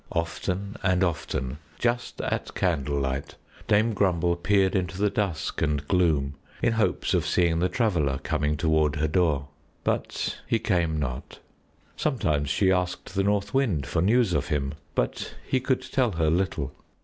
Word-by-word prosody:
Often 90 +4 -2
and 90 0 +2
often, 75 -5 -2 0.2
just 120 0 -1
at - - -3
candlelight, 70 -5 -1 0.3
Dame 110 +2 +3
Grumble 90 -4 +2
peered 95 +2 +2
into 90 -1 -1
the 105 0 +2
dusk 90 -7 -2
and 75 -1 0
gloom 80 -7 +2 0.3
in 115 - +2
hopes 110 -1 +1
of - - +3
seeing 85 -2 +2
the 90 +2 +2
Traveler 85 - +1
coming 75 +1 -1
toward 80 0 +2
her 80 +1 +1
door; 75 -4 +1 0.3
but - - -1
he 115 - +2
came 85 -7 +1
not. 65 -3 -4 0.6
Sometimes 75 - 0
she 95 +6 +3
asked 90 +1 -1
the 95 - +1
North 100 0 0
Wind 110 - +1
for 75 +3 0
news 110 +1 +3
of 90 - 0
him, 70 -4 -1 0.2
but - - -2
he 130 - +2
could 130 0 0
tell 125 -6 +1
her 80 -2 +1
little. 80 -6 -1
85 Hz, 155 wpm, -26 LUFS, 75-100 Hz, 0.6 s, Dame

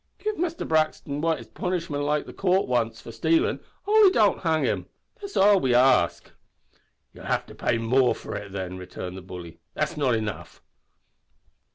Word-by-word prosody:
Give 430 0 -3
Muster 340 -2 -2
Brixton 155 -2 0
what 155 -9 -2
punishment 150 -5 -1
the - - -10
coort 190 0 +1
likes 115 -3 0
for 115 - -10
stailin' 160 +9 +1 0.3
only 420 -2 +6
don't 215 - +3
hang 160 -2 +1
him. - - -1 0.3
That's 400 0 -6
all 200 0 +6
we 130 -7 +1
ask." 125 -8 +3 0.8
"You'll - - -12
have - - 0
to - - -13
pay - - 0
more 125 +3 +2
for - - -7
it 105 -1 -6
then," 95 -1 -5
returned 90 0 -7
the 95 - -8
bully. 90 -2 -10 0.2
"That's - - -2
not 130 -5 +2
enough." 110 -2 -5
140 Hz, 165 wpm, -25 LUFS, 110-180 Hz, 0.8 s, only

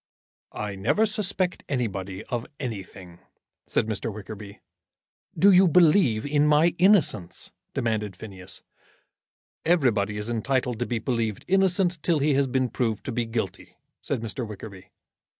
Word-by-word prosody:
"I 105 -1 -3
never 100 - +2
suspect 200 -4 0
anybody 100 -8 -3
of 120 -2 -4
anything," 95 -7 -7 0.5
said - - +1
Mr. 110 +1 -3
Wickerby. 105 0 -9 0.8
"Do 200 +2 +6
you 185 0 +6
believe 155 - +4
in 145 +1 +2
my 150 +3 +4
innocence?" 155 - +2 0.2
demanded 110 -4 -1
Phineas. 95 -2 -9 1.0
"Everybody 120 - +2
is 105 +1 -4
entitled 125 0 -1
to - - -1
be 120 - -1
believed 115 -3 -2
innocent 185 -2 +2
till 170 0 +2
he 145 +1 +2
has 135 0 +2
been 130 0 0
proved 115 -2 -2
to - - -3
be 120 0 -1
guilty," 110 -5 -5 0.2
said - - -3
Mr. 115 +3 -3
Wickerby. 100 -3 -9
120 Hz, 135 wpm, -25 LUFS, 105-150 Hz, 1.0 s, Do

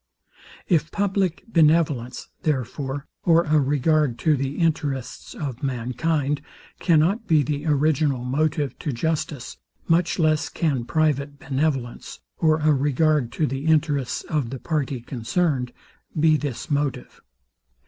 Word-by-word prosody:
If 165 -3 +2
public 195 -3 0
benevolence, 155 - +2
therefore, 140 0 -2 0.2
or 170 -1 +4
a 155 -1 +3
regard 145 -1 +2
to 155 -2 +5
the 135 +1 -3
interests 145 -6 -2
of 135 -5 -5
mankind, 140 +3 -1 0.4
cannot 180 +8 +2
be 155 -3 +4
the 145 +3 -3
original 145 -3 +1
motive 145 +1 -1
to 150 - -2
justice, 145 -1 -3 0.3
much 170 +1 +2
less 155 -3 +2
can 140 -8 -1
private 145 -1 0
benevolence, 135 -3 -2 0.2
or 155 -1 +3
a 155 0 +4
regard 145 -1 +2
to 155 - +1
the 135 +3 -3
interests 145 -4 +1
of 150 -7 -2
the 135 - -5
party 140 -3 -2
concerned, 125 +2 -1 0.5
be 155 0 +5
this 145 -2 -4
motive. 145 -1 -2
150 Hz, 125 wpm, -23 LUFS, 135-160 Hz, 0.5 s, to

